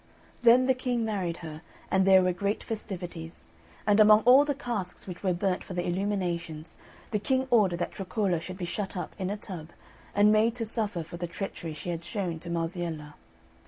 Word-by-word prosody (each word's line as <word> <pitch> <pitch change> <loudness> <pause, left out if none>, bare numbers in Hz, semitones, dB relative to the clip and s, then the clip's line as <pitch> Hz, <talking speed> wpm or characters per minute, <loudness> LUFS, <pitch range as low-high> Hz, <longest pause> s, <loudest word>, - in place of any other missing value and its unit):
Then 240 +2 +6
the 260 - +4
King 250 -2 -1
married 185 -6 -2
her, 155 0 -7 0.3
and 190 0 +3
there 190 -1 +7
were 180 0 +2
great 200 +3 -1
festivities; 175 -6 -6 0.3
and 205 0 +4
among 215 0 +8
all 255 +5 +7
the 285 -1 -1
casks 215 -9 -4
which 180 -2 -8
were 190 - +1
burnt 180 +1 0
for 185 - -7
the 175 - -1
illuminations, 175 -4 -2 0.4
the 210 - +1
King 260 +4 +1
ordered 200 -7 +4
that 175 - -2
Troccola 195 -3 -1
should 185 +2 -7
be 180 - -3
shut 195 +2 -4
up 175 - -4
in 185 -1 -1
a 205 - -2
tub, 175 -6 -8 0.5
and 205 +1 +6
made 220 +2 +3
to 235 -2 -2
suffer 210 -6 -2
for 165 +2 -9
the 175 0 -3
treachery 170 -2 -5
she 175 +4 -4
had 170 -1 -4
shown 175 -3 -3
to 170 - -8
Marziella. 165 -3 -3
190 Hz, 200 wpm, -28 LUFS, 170-215 Hz, 0.5 s, among